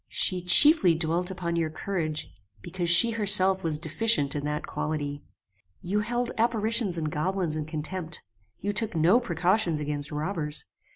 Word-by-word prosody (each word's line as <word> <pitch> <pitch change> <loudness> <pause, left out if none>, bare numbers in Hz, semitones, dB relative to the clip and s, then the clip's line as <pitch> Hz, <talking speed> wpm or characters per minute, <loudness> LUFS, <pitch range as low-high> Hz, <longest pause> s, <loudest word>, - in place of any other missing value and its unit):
She 185 -2 +1
chiefly 185 - +6
dwelt 165 +3 -2
upon 180 -3 -4
your 165 -1 -1
courage, 155 -2 -4 0.4
because 175 -2 -4
she 180 +8 +5
herself 195 -3 +4
was 160 -2 0
deficient 160 -1 0
in 145 - -3
that 150 0 -3
quality. 145 -2 -4 0.6
You 195 +4 -2
held 240 +3 -2
apparitions 225 -4 +1
and 155 -2 -3
goblins 175 +1 -2
in 155 -1 -4
contempt. 160 +2 -4 0.3
You 205 +8 -3
took 210 -2 0
no 170 +9 +4
precautions 180 -4 0
against 145 0 -4
robbers. 150 -1 -4
175 Hz, 150 wpm, -26 LUFS, 155-205 Hz, 0.6 s, chiefly